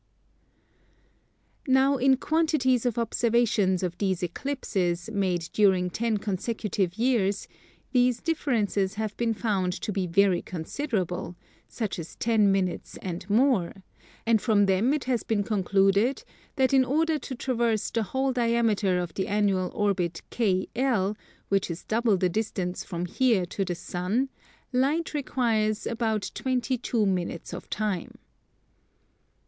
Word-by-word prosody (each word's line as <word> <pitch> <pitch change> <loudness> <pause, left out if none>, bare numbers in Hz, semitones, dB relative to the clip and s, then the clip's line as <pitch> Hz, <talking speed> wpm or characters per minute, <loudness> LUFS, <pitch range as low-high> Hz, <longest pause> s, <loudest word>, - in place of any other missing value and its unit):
Now 265 +1 +4
in 265 +1 +4
quantities 270 -6 +1
of 240 - -2
observations 225 -5 +1
of 180 -1 -3
these 190 -2 0
Eclipses, 180 - -2
made 185 -5 0
during 190 -4 +3
ten 225 +2 0
consecutive 200 -2 -2
years, 225 -5 +1 0.4
these 250 -2 +3
differences 220 - 0
have 215 -1 -3
been 230 -2 0
found 195 -5 0
to 210 - -4
be 190 -2 -1
very 185 +1 +3
considerable, 180 - -3 0.3
such 215 -6 -4
as 165 - -8
ten 220 -3 +3
minutes 190 -2 -1
and 180 +1 -5
more; 210 -5 +2 0.4
and 225 -2 +3
from 210 -4 +3
them 195 +6 +2
it 300 -1 0
has 245 -4 0
been 210 -2 0
concluded 200 +4 +2 0.3
that 265 -1 +2
in 265 -1 +6
order 310 +4 +1
to 265 - -6
traverse 235 -4 0
the 230 - 0
whole 265 +5 -1
diameter 230 -6 +2
of 175 -2 -3
the 190 - -2
annual 200 -3 +1
orbit 185 -5 -1
KL, 215 0 0 0.3
which 195 -1 +1
is 170 0 -5
double 225 -2 +2
the 185 - +2
distance 185 -2 -2
from 175 -1 -4
here 220 -1 +2
to 195 +3 -3
the 180 -2 -3
sun, 185 +11 -2 0.4
Light 290 +7 +1
requires 230 -7 0
about 220 -4 -1
22 250 -3 0
minutes 180 -3 -2
of - - -8
time. 210 -5 -2
215 Hz, 130 wpm, -27 LUFS, 190-245 Hz, 0.4 s, in